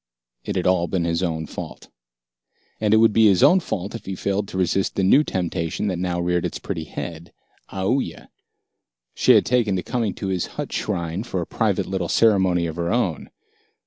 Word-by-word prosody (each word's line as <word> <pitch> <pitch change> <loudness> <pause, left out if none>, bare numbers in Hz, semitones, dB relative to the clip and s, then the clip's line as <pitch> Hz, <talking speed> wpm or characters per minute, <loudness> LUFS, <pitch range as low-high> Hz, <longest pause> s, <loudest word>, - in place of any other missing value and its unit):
It - - -4
had 90 - -1
all 90 -2 +2
been 90 -2 -1
his 85 0 0
own 80 -3 -2
fault. - - -9 0.9
And 105 -1 +1
it 110 - +6
would 110 -1 +5
be 110 0 +5
his 95 -3 +4
own 185 - +6
fault 100 - -4
if 115 -4 -8
he 95 - -3
failed 100 +2 -2
to 95 - -6
resist 95 +1 0
the 95 - 0
new 135 +11 +5
temptation 90 - -2
that 90 -2 -3
now 90 -1 -1
reared 90 0 0
its - - -3
pretty 80 - -5
head 85 +1 -7 0.4
Aoooya. 100 +8 -2 0.8
She - - +4
had - - +5
taken 115 -5 +1
to 90 - -2
coming 115 -3 -2
to 95 - -4
his 90 -2 -1
hut - - -4
shrine 85 -3 -2
for 100 -5 -4
a 85 - -2
private - - 0
little 95 -3 -3
ceremony 95 -6 +3
of 80 0 -5
her 85 0 -1
own. 100 - -1
95 Hz, 200 wpm, -22 LUFS, 85-105 Hz, 0.9 s, it